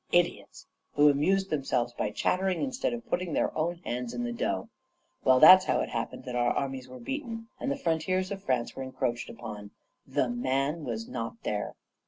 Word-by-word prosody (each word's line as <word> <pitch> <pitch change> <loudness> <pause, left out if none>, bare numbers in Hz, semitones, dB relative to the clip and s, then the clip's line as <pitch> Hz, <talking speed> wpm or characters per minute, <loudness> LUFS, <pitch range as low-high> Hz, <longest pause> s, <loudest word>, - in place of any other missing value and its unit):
Idiots! 175 0 +1 0.3
who 145 0 +6
amused 190 +7 +2
themselves 130 -5 0
by 105 - -1
chattering, 185 - 0
instead 265 -1 -1
of 240 0 -5
putting 180 -7 -1
their - - 0
own 165 +3 0
hands 125 0 -3
in 120 - -2
the 120 - -2
dough. - - -1 0.6
Well, 130 0 +5
that's 185 +5 +10
how - - +2
it - - -3
happened 115 -1 -4
that 125 -1 -5
our 120 0 +2
armies 135 -2 -2
were 130 - -9
beaten, 230 - -5
and 275 - -1
the 280 - -1
frontiers 185 - 0
of 195 -1 -4
France 125 -3 -1
were - - -5
encroached 130 -2 -2
upon: 105 -2 -8 0.4
THE 130 - +1
MAN 135 +6 -1
was 115 -2 -4
nor 115 0 -5
there. 105 -1 -2
140 Hz, 190 wpm, -29 LUFS, 120-185 Hz, 0.6 s, that's